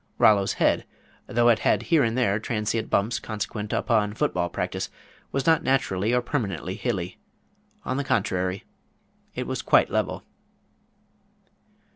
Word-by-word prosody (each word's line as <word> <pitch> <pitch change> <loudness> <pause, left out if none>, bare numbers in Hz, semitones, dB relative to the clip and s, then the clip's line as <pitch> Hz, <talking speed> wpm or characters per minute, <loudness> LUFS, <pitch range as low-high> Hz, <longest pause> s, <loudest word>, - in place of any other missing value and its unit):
Rollo's 100 -2 +4
head, - - +1 0.4
though 120 +1 +3
it 115 - +4
had - - +2
here 165 -4 +3
and 115 +1 0
there 105 -5 +2
transient 110 0 -2
bumps 115 +4 +1
consequent 105 -1 -4
upon 105 -3 +1
foot 150 +4 0
ball 85 -1 0
practice, - - -3 0.4
was 135 - -1
not 160 -2 +4
naturally 110 -6 +1
or 125 0 +2
permanently 100 - -2
hilly. 95 -4 -3 0.7
On 130 - -1
the 140 - 0
contrary, 95 -7 -1 0.7
it - - -3
was - - -3
quite - - +4
level. - - -1
110 Hz, 140 wpm, -25 LUFS, 100-125 Hz, 0.7 s, Rollo's